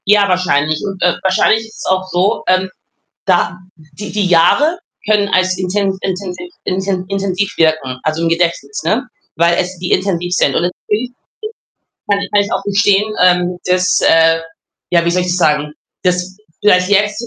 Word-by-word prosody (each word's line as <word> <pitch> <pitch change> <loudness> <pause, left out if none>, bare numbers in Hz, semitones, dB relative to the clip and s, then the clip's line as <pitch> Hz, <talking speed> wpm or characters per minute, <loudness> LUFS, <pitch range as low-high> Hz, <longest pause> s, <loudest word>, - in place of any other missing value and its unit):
Ja, 205 0 +4
wahrscheinlich. 155 -5 0
Und, 195 -2 -6
äh, 180 -1 +2
wahrscheinlich 215 +4 +2
ist 220 - -17
es - - -7
auch 185 0 0
so, 190 +5 0
ähm, 185 +1 +2 0.6
da 175 -2 +1 0.2
die 155 +5 -10
die 210 -2 0
Jahre 280 - +3 0.3
können 210 -1 +2
als 185 0 +2
inten 190 +1 -1
intensiv 190 - -5
inten 185 0 -2
intensiv 195 0 -2
wirken, 155 -6 +1
also, 155 +2 -1
im 165 - +1
Gedächtnis, 165 -4 -1
ne? 225 - 0 0.3
Weil 170 +1 +3
es 185 +1 -2
die 180 +1 -3
intensiv 180 -2 -1
sind. - - +2
Und - - +1 0.3
natürlich 225 +4 -1 1.0
kann 200 0 +2
kann 205 -1 +4
ich 200 - -6
auch - - -1
gestehen, 205 +1 +2
ähm, 180 0 +2
dass, 180 0 +2
äh 165 0 +4 0.5
ja, 170 -1 +3
wie 170 - +1
soll 180 +1 +1
ich 180 - -4
das 175 - 0
sagen? 150 -3 +1 0.3
Dass 180 +1 -1 0.2
vielleicht 185 -3 +3
jetzt 205 +3 +1
185 Hz, 170 wpm, -15 LUFS, 170-200 Hz, 1.0 s, Ja